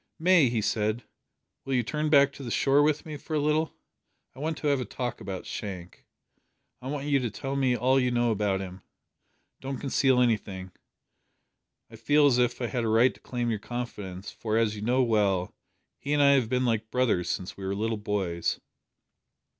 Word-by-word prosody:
"May," 165 -5 +5
he 115 -2 0
said, 110 +2 0 0.6
"will 135 - -2
you 125 - +2
turn 150 +6 -2
back 140 -2 +5
to - - -11
the 125 - -5
shore 140 +4 +3
with 150 +2 +1
me 155 -2 -6
for 155 +2 -5
a - - +2
little? 150 +2 0 0.6
I 130 - -14
want 155 +2 -2
to 150 - -3
have 140 -2 +2
a - - -1
talk 120 +2 -5
about 95 -2 -6
Shank. 95 -4 -7 0.7
I 130 - -7
want 140 0 -3
you 145 -2 +2
to 125 -3 -2
tell 135 +6 -5
me 130 -3 +2
all 130 +3 +3
you 125 -1 +1
know 120 -1 +1
about 100 -2 0
him. 95 0 -8 0.8
Don't 135 0 -5
conceal 135 -1 +2
anything. 100 -6 0 1.2
I 115 - -11
feel 145 +7 +3
as 130 -3 +4
if 120 0 +1
I - - +1
had 120 0 -2
a - - 0
right 115 +4 +4
to - - -20
claim 120 -2 -3
your 110 - -2
confidence, 105 -5 -6
for, 110 -1 -2
as 110 -2 +1
you 105 - -7
know 125 +4 +2
well, 100 -6 +1 0.5
he 145 - -2
and 145 -1 +4
I 140 - +6
have 130 -5 +3
been 125 0 +1
like 110 -2 0
brothers 115 -9 +1
since 90 -2 -3
we 100 - -9
were 95 +1 -2
little 110 +2 -1
boys." 100 -5 -2
120 Hz, 200 wpm, -27 LUFS, 105-140 Hz, 1.2 s, I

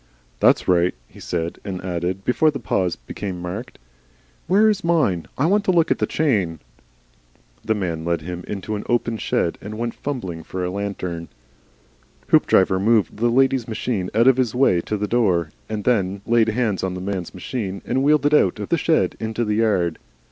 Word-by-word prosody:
"That's - - +4
right," 90 0 +3
he - - -16
said, 85 -1 -3
and 95 -2 -4
added, 90 +2 -3
before 155 +5 +3
the 145 - -3
pause 95 -6 -1
became 90 +9 -6
marked, 100 +9 -6 0.7
"Where 205 +5 +5
is 205 -2 +1
mine? 150 - +1
I 140 - +2
want 200 +4 +3
to - - +3
look 170 -2 +3
at - - +1
the - - +1
chain." 100 - 0 1.0
The 110 - 0
man 85 -5 -3
led 85 -1 -1
him 90 +2 -6
into 105 +1 -4
an 105 - -4
open 120 -1 +1
shed, 85 - -1
and 105 +1 -7
went 115 0 -2
fumbling 95 - -5
for 90 +3 -4
a 90 - -2
lantern. 90 -4 -4 1.0
Hoopdriver 95 0 +4
moved 110 0 +2
the 120 +2 +2
lady's 130 0 +2
machine 110 -4 -2
out 115 +2 +4
of 130 -1 +6
his 125 -3 0
way 125 -10 +3
to 105 - -3
the 105 +1 -2
door, 90 -10 +1 0.2
and 105 -1 -3
then 100 -4 0
laid 115 -1 +3
hands 110 -4 0
on 95 -1 -2
the - - -5
man's 95 -1 -4
machine 100 0 -4
and 130 +2 0
wheeled 145 0 +3
it 145 - +3
out 95 -11 +4
of - - -6
the - - +2
shed - - +1
into 110 +1 -2
the 105 0 0
yard. 95 -7 +1
105 Hz, 190 wpm, -22 LUFS, 90-120 Hz, 1.0 s, of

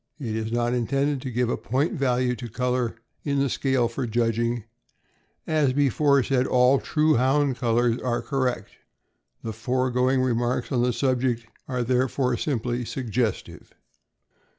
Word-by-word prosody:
It 115 -6 -3
is 110 0 -3
not 120 +1 0
intended 135 +3 0
to 130 - -5
give 125 0 0
a - - -1
point 135 - -1
value 125 -5 +1
to 120 0 -7
color 125 0 -1 0.3
in 140 -1 -1
the 140 -2 +1
scale 130 -3 +1
for 120 +2 -4
judging, 115 0 0 0.8
as 150 -5 +2
before 140 0 +3
said, 130 -1 +1
all 125 +2 +4
true 155 0 +2
Hound 135 +1 +2
colors 120 -1 +1
being 120 -2 -1
correct. 130 -3 -2 0.7
The 110 - -4
foregoing 125 +3 +1
remarks 120 +1 -1
on 125 -3 +1
the 125 0 +2
subject 125 -2 0 0.2
are 125 -3 -1
therefore 125 +1 +1
simply 120 -2 -2
suggestive. 120 -3 -3
125 Hz, 145 wpm, -25 LUFS, 120-135 Hz, 0.8 s, all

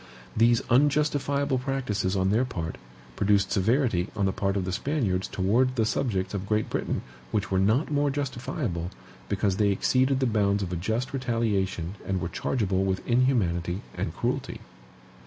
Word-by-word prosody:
These 115 +1 +4
unjustifiable 140 0 +2
practices 125 -8 -1
on 95 0 +2
their 115 +4 +3
part 85 -10 -4 0.4
produced 100 +1 +2
severity 105 -3 +2
on 100 -2 +1
the 95 - +2
part 100 0 0
of 95 - -1
the 95 - -2
Spaniards 100 - -1
toward 120 +7 +1
the 115 -3 +2
subjects 100 -5 -1
of 100 -1 -3
Great 110 +1 0
Britain - - -2 0.3
which 100 +9 -1
were 95 - +2
not 110 +11 +2
more 145 0 +2
justifiable, 125 - -3 0.4
because 95 -1 0
they 105 -2 +3
exceeded 130 +7 +2
the 135 - +2
bounds 100 -3 +2
of 90 -1 -4
a - - 0
just 110 +10 -2
retaliation 105 -8 -1
and 95 -1 -1
were 85 -1 -3
chargeable 95 -2 0
with 95 -1 -2
inhumanity 100 -8 +1
and - - -4
cruelty. - - -2
105 Hz, 160 wpm, -27 LUFS, 95-130 Hz, 0.4 s, These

